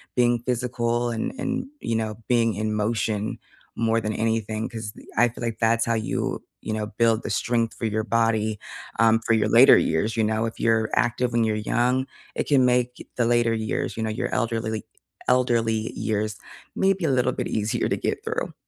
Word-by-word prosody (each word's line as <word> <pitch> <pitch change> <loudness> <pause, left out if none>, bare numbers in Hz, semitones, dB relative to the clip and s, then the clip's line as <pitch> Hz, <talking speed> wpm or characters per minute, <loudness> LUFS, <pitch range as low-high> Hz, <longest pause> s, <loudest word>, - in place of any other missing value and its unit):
being 120 -1 +2
physical 120 -1 0
and 115 - -2
and, 255 0 -2
you 115 - -2
know, 110 -1 -1
being 115 -3 +3
in 110 +1 -1
motion 105 0 -1 0.4
more 115 0 +2
than 105 +1 -2
anything, 110 0 -1
‘cause 110 -3 -6 0.3
I 120 +1 +5
feel 120 - -12
like 115 -1 -3
that's 115 0 +2
how 115 - +1
you 110 - -2 0.2
you 110 - -3
know, 110 -1 -2
build 115 +2 +1
the - - -4
strength 115 -1 0
for - - -5
your 110 0 0
body, 110 -2 +1 0.4
um, 115 0 +5
for 115 - +3
your 110 - +2
later - - +8
years, 105 +9 0
you 110 - +2
know, 110 +1 +1
if 115 - -6
you're 110 -1 +2
active 120 +1 +1
when 115 0 +2
you're 110 -1 +1
young, 125 +2 +1 0.3
it - - -1
can 135 -3 +4
make 125 0 0
the 120 - +1
later 120 -1 +3
years, 110 0 -2
you 110 - -1
know, 110 - -1
your 110 - -3
elderly, 115 -3 -1
like 110 -2 -4 0.4
elderly 115 -3 +2
years, 110 0 -1 0.4
maybe 195 -1 +2
a 150 - +2
little 125 -1 +2
bit - - -3
easier 110 0 -1
to - - 0
get - - -2
through. - - -3
115 Hz, 195 wpm, -24 LUFS, 110-120 Hz, 0.4 s, later